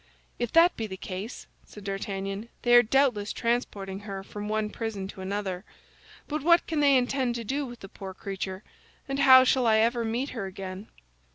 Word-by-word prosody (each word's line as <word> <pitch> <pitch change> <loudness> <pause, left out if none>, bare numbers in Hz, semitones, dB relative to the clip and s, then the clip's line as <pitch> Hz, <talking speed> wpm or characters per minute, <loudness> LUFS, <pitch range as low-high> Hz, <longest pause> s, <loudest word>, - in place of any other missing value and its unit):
"If 240 -2 -2
that 335 +2 +6
be 225 - -3
the 190 -2 -7
case," 190 +5 -6 0.2
said 210 - -13
D'Artagnan, 195 +1 -4
"they 240 - +3
are 240 - +10
doubtless 245 -4 +2
transporting 205 -5 -2
her 200 -2 -7
from 205 +1 -7
one 215 0 -1
prison 215 -4 -4
to 190 - -9
another. 190 -1 -3 0.6
But 305 +1 -2
what 340 +3 +4
can 320 -2 -2
they 280 -2 +5
intend 250 -1 0
to 235 - -4
do 275 +5 -2
with 240 -1 -11
the 195 - -8
poor 190 0 -9
creature, 190 0 -5 0.4
and 275 0 -2
how 260 -2 +9
shall 255 -1 +2
I 220 -1 +5
ever 230 +2 +2
meet 235 +5 -2
her 210 -6 -4
again?" 190 +2 -7
220 Hz, 190 wpm, -27 LUFS, 195-255 Hz, 0.6 s, are